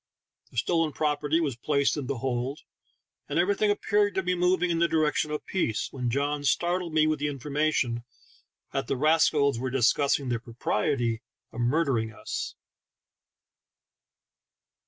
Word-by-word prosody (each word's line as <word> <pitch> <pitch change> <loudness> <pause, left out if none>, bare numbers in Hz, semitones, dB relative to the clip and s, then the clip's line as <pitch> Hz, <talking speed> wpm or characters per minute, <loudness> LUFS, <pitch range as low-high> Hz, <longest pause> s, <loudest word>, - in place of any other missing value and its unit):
The - - -14
stolen 165 +4 +1
property 150 +1 +1
was 145 -7 -1
placed 140 0 +1
in 140 -4 -4
the 140 -1 -2
hold, 130 +3 -2 0.7
and 145 - -1
every 180 +4 +3
thing 210 +1 +1
appeared 205 0 +1
to 190 - 0
be 180 +1 +1
moving 180 0 +2
in 165 - 0
the 170 - +4
direction 155 -2 +1
of 150 0 -4
peace, 120 - -1
when 125 -2 -2
John 145 +3 -1
startled 175 +4 0
me 155 0 +3
with 155 -1 +1
the 145 - 0
informa 145 +2 -1
tion 120 -5 -1 0.7
that 135 -3 -2
the - - -1
rascals 150 -3 +3
were 130 +1 -2
discussing 135 +2 +2
the 120 -1 0
propriety 115 0 -1 0.3
of 115 - -8
murdering 120 -4 +1
us 110 - -5
145 Hz, 155 wpm, -27 LUFS, 125-165 Hz, 0.7 s, the